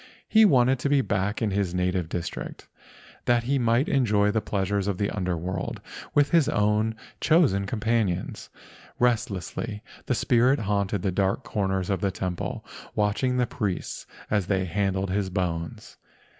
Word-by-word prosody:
He 220 0 +6
wanted 130 -6 +4
to 140 - -1
be 140 -1 +4
back 100 -1 -1
in 105 - +1
his 95 -3 -1
native 90 -2 0
district, 85 -1 -5 0.6
that 120 -1 +3
he 135 +3 +1
might 120 +3 +2
enjoy 105 -6 +3
the 110 - 0
pleasures 100 -1 -1
of 100 -3 -1
the 100 +1 -1
Under 90 -4 -1
world 90 +3 -4 0.4
with 145 -1 +4
his 165 -5 +4
own 105 +2 +1 0.2
chosen 140 - +3
companions. 110 -4 -1 0.5
Restlessly 105 -2 -1 0.2
the 125 - +1
spirit 125 +3 +3
haunted 100 -2 -1
the 95 - +1
dark 95 +7 0
corners 95 -2 -1
of 95 - -1
the 100 - +2
temple, 90 -1 -4 0.3
watching 110 +5 +1
the 125 - +3
priests 100 -4 -4 0.2
as 105 -4 +1
they 95 -2 +1
handled 95 +1 -1
his 100 0 0
bones. 85 -4 -3
105 Hz, 155 wpm, -26 LUFS, 95-120 Hz, 0.6 s, He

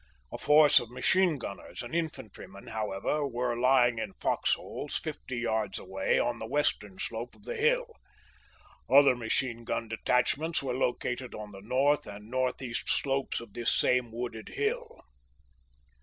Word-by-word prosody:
A - - -5
force 150 0 +7
of 120 - -7
machine 170 +8 +2
gunners 120 -5 -7
and 120 - -8
infantrymen, 110 - -5
how 110 -1 -3
ever, 140 +10 -1
were 120 -1 -1
lying 120 -1 +4
in - - -4
fox - - +1
holes - - -5
fifty 130 - -5
yards 110 -4 -1
away 95 0 0
on 120 - 0
the 110 - -5
west 145 -2 +1
ern 100 -2 -13
slope 115 +4 -5
of - - -21
the 485 - -4
hill. 475 +2 +2 1.0
Other 140 -1 +7
machine 120 0 -1
gun 115 - -2
detachments 135 +8 +1
were 130 -2 -2
located 125 0 -2
on 105 -1 -7
the 95 -1 -11
north 135 +7 +2
and 105 +2 -10
northeast 130 -1 -2
slopes 135 -1 0
of 115 -4 -11
this 120 -1 0
same 125 -2 +2
wooded 115 -1 -5
hill. - - -2
125 Hz, 155 wpm, -30 LUFS, 110-135 Hz, 1.0 s, force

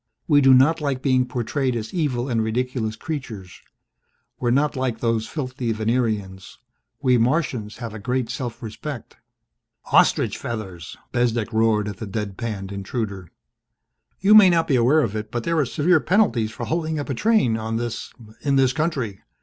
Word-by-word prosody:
We 145 -2 +5
do 135 -1 +7
not 155 +5 +4
like 140 -3 -2
being 130 -2 +2
portrayed 125 +1 -1
as 110 -1 -5
evil 140 -7 -1
and 115 -4 0
ridiculous 115 -1 -2
creatures. 115 - -7 0.8
We're 120 - 0
not 145 +5 +2
like 130 -3 -2
those 115 -2 0
filthy 130 -5 -3
Venerians. 110 -4 -2 0.5
We 125 -2 +4
Martians 120 -4 0
have 115 -3 -6
a 110 - -7
great 125 +3 -1
self 120 -1 -5
respect." 120 +4 -7 0.8
"Ostrich - - +3
feathers!" 95 -8 -6
Bezdek 120 -2 0
roared 110 -2 +2
at 100 -2 -5
the 110 - -6
dead 100 -1 -4
panned 100 -4 -5
intruder. 100 -2 -4 0.9
"You 200 +3 +5
may 210 -3 +9
not 165 -2 +2
be 135 - +2
aware 130 +6 +4
of 110 -6 -2
it 105 0 -4
but 120 +1 -3
there 165 -1 0
are 145 - +2
severe 160 +8 +3
penalties 150 - +2
for 115 +4 -6
holding 160 -1 -1
up 145 - -4
a - - 0
train 210 - +2
on 110 0 -3
this 120 0 -4 0.3
in 140 -1 +1
this 135 -1 +3
country. 140 - -2
120 Hz, 170 wpm, -23 LUFS, 110-140 Hz, 0.9 s, may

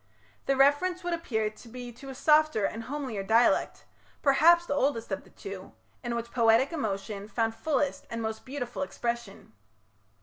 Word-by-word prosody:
The 275 - +2
reference 320 +7 +3
would 350 0 -1
appear 220 -11 -1
to 215 +3 -15
be 245 +1 -8
to 260 +4 -11
a 265 - -7
softer 305 -6 +3
and 225 +3 -4
homelier 260 -7 -4
dialect, 225 +5 +2 0.4
perhaps 335 +5 +5
the 285 - -2
oldest 270 -6 0
of 190 - -3
the - - -18
two, 195 -1 -9 0.3
in 240 -1 -2
which 235 0 -4
poetic 235 +4 +3
emotion 205 -6 -3
found 225 0 0
fullest 285 +2 -1
and 230 - -4
most 220 -1 -4
beautiful 255 -2 -5
expression. 235 - -4
240 Hz, 165 wpm, -28 LUFS, 220-285 Hz, 0.4 s, perhaps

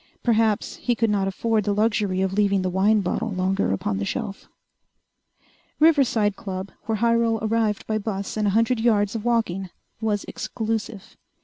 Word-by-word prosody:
Perhaps 225 -3 +1
he 245 - 0
could 225 -1 +1
not 195 -2 +1
afford 220 +3 0
the 205 +1 0
luxury 210 -3 +1
of 190 0 -1
leaving 200 -1 +2
the 185 - -1
wine 205 +3 +3
bottle 225 +5 -2
longer 190 - 0
upon 95 0 -1
the - - -2
shelf.... 195 - -4 1.3
Riverside 260 -10 +3
Club, 190 0 -6 0.2
where 225 - +1
Hyrel 230 0 +2
arrived 220 -1 0
by 215 0 -1
bus 200 -2 -4
and 215 -1 0
a 200 - +1
hundred 230 +1 +2
yards 210 -3 +2
of 225 -2 -4
walking, 220 -6 0 0.3
was 210 -2 0
exclusive. 220 -2 -4
210 Hz, 165 wpm, -24 LUFS, 195-225 Hz, 1.3 s, wine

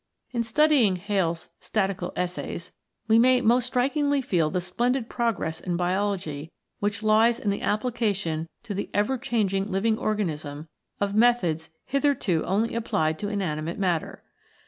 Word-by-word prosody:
In 235 - 0
studying 240 -3 +3
Hales' 180 -3 -1
Statical 195 -4 -1
Essays 180 -1 -4 0.4
we 225 0 +5
may 255 +1 +6
most 240 +1 +3
strikingly 280 +3 +1
feel 180 - +1
the 180 - -1
splendid 240 +7 -1
progress 225 -9 -1
in 175 -2 -2
Biology 180 -4 -1 0.3
which 205 +1 -2
lies 220 +2 +4
in 205 - 0
the 200 - -3
application 205 -8 -1
to 210 - -5
the 200 - -3
ever 240 +6 +1
changing 200 -6 0
living 215 +4 +1
organism 155 -8 -2 0.3
of 200 0 0
methods 205 -9 +2 0.2
hitherto 275 - +1
only 215 +5 +1
applied 160 -9 0
to 205 - -3
inanimate 170 -5 -2
matter. 180 -5 -1
205 Hz, 140 wpm, -26 LUFS, 175-235 Hz, 0.4 s, may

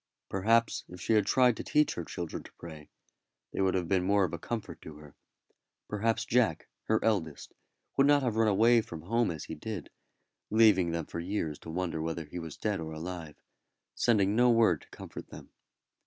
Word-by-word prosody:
Perhaps 115 +4 +2
if 90 - -10
she 100 - 0
had 105 -2 +3
tried 125 -3 +4
to - - -5
teach 150 0 +2
her 85 - -4
children 85 0 -5
to - - -14
pray, 80 -3 -11 0.6
they - - -1
would 95 -1 +2
have 90 -2 -1
been 95 0 +2
more 100 +1 +3
of 90 - -1
a 85 - -4
comfort 115 +4 -5
to 80 - -10
her. 75 -1 -14 0.7
Perhaps 110 +2 0
Jack, 115 -10 +1 0.2
her 110 0 +2
eldest, 85 -10 -1 0.4
would 135 0 +5
not 145 -1 +4
have 120 -4 0
run 110 0 +3
away 115 +3 +5
from 80 -7 -9
home 115 +5 +1
as 80 -4 -5
he - - -7
did, 105 +7 -6 0.6
leaving 105 -5 +5
them 85 -1 -2
for - - -6
years 85 -4 -3
to - - -11
wonder 85 -1 -2
whether 80 0 -3
he 85 +4 -7
was 80 -3 -8
alive 105 -2 +1
or 80 0 -6 0.3
dead, 75 - -16
but - - -40 0.5
sending 105 -4 +2
no 125 +1 +5
word 115 -9 +4
to - - -19
comfort - - -9
them. - - -12
95 Hz, 200 wpm, -30 LUFS, 85-115 Hz, 0.7 s, would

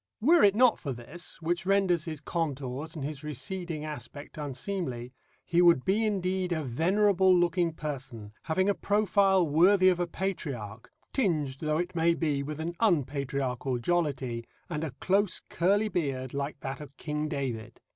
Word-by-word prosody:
Were 325 +10 +5
it 200 -1 +6
not 250 0 +5
for 140 - -4
this, 125 +8 -7
which 175 +1 0
renders 190 -4 +2
his 155 -3 -5
contours 145 -1 -3
and 145 -4 -4
his 150 -1 -6
receding 150 +3 -4
aspect 145 -1 -8
unseemly, 135 -3 -4 0.3
he 175 +1 +3
would 170 -7 +5
be 205 +4 +2
indeed 185 -2 -1
a 160 -2 0
venerable 185 - +3
looking 175 0 +2
person, 135 -9 -6
having 185 +4 +1
a 205 - +4
profile 200 -3 +3
worthy 185 +5 +5
of 180 -1 +1
a 175 - 0
patriarch, 135 - -4 0.2
tinged 155 - 0
though 155 -1 0
it 175 +2 -2
may 170 0 +3
be 150 -5 0
with 150 +2 -5
an 165 +2 -3
unpatriarchal 140 - 0
jollity, 130 -5 -1 0.3
and 155 -1 -2
a 160 - -2
close 195 +1 +2
curly 200 +5 +2
beard 135 - -2
like 140 +1 -4
that 135 +2 -5
of 140 -2 -11
King 150 0 -3
David. 120 -7 -4
160 Hz, 160 wpm, -29 LUFS, 140-185 Hz, 0.3 s, it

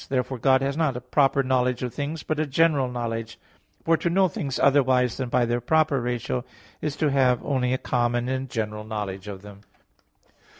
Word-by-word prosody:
Therefore 130 -1 -1
God 130 +2 +3
has 140 0 -1
not 155 -6 0
a - - -3
proper 135 +2 +2
knowledge 125 -1 +1
of 125 - -3
things, 150 +2 -4
but 155 -1 -2
a 155 - 0
general 145 -2 +2
knowledge; 115 -2 -4 0.5
for 165 0 +4
to 170 - -1
know 190 +2 +3
things 140 -6 -4
otherwise 130 -3 +3
than 130 -2 -3
by 125 0 +2
their 120 +1 -1
proper 155 0 +2
ratio 120 +1 -2 0.4
is 150 -2 -2
to 150 -1 +1
have 130 -3 +2
only 130 -3 0
a 130 - +1
common 120 -1 0
and 130 0 -2
general 105 -2 -3
knowledge 105 -3 -5
of 100 -1 -8
them. 100 -1 -12
130 Hz, 195 wpm, -25 LUFS, 120-140 Hz, 0.5 s, for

